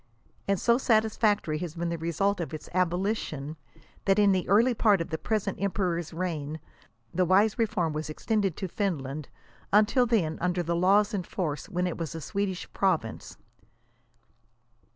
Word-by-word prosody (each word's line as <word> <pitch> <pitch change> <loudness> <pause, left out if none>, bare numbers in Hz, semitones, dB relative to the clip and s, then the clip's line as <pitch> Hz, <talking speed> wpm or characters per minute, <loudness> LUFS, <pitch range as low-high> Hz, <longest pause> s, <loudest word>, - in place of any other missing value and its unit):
And 200 -2 +1
so 235 +1 +3
satisfactory 215 - +2
has 170 -2 -5
been 170 0 -2
the 170 - -2
result 175 +5 0
of 165 -2 -4
its 155 - -10
abolition, 175 -5 -1 0.5
that 195 0 +3
in 205 -1 +5
the 185 -2 0
early 230 +6 +5
part 210 -3 +3
of 165 +1 -4
the 160 - -1
present 210 -4 -2
emperor's 180 -4 -1
reign 160 -3 -3 0.5
the 185 - +2
wise 200 +6 +3
reform 205 -8 0
was 155 +1 -4
ex 155 - -9
tended 205 -7 +1
to 190 - -3
Finland, 155 -7 -3 0.4
until 215 +5 +4
then 180 -9 +1
under 180 0 0
the 170 +1 -1
laws 200 +5 +3
in 200 - 0
force 165 -3 -4
when 180 -2 -1
it 180 - -3
was 165 -3 -4
a - - -4
Swedish 190 +3 -3
province. 165 - -1
185 Hz, 165 wpm, -28 LUFS, 165-205 Hz, 0.5 s, in